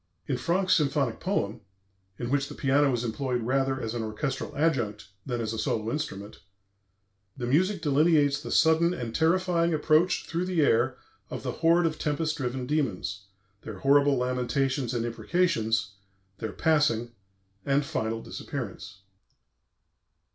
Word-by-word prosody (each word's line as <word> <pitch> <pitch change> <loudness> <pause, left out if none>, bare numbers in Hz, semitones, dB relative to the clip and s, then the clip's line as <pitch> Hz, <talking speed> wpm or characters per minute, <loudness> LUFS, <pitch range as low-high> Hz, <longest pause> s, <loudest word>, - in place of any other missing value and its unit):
In 135 - 0
Franck's 180 +9 +1
symphonic 140 -6 +1
poem 120 - -2 0.6
(in 120 0 -4
which 140 0 +1
the - - -8
piano 140 +1 +3
is 120 -1 -1
employed 125 +1 -2
rather 135 +2 0
as 115 -2 -4
an 120 - -2
orchestral 130 +7 -4
adjunct 120 - 0 0.2
than 120 -2 -2
as 115 -1 -2
a 110 - -4
solo 110 +1 -1
instrument) 105 -10 -5 1.0
the 125 - -3
music 175 +8 +1
delineates 145 -1 +3
the - - -7
sudden 165 +2 +4
and 115 -6 -5
terrifying 170 +1 +2
approach 155 +4 +2
through 170 +2 -2
the 180 -3 +1
air 115 - +2 0.3
of - - -6
the - - -2
horde 170 +1 +3
of 155 -2 -1
tempest 155 +1 -1
driven 130 -3 -3
demons, 105 -9 -2 0.3
their 110 -3 -8
horrible 140 +5 +4
lamentations 125 +1 -1
and 115 -1 -1
imprecations, 115 - 0 0.5
their 110 -2 -4
passing 145 -8 +1 0.5
and 140 +1 +1
final 115 -7 -2
disappearance. 95 - -7
135 Hz, 140 wpm, -27 LUFS, 115-160 Hz, 1.0 s, sudden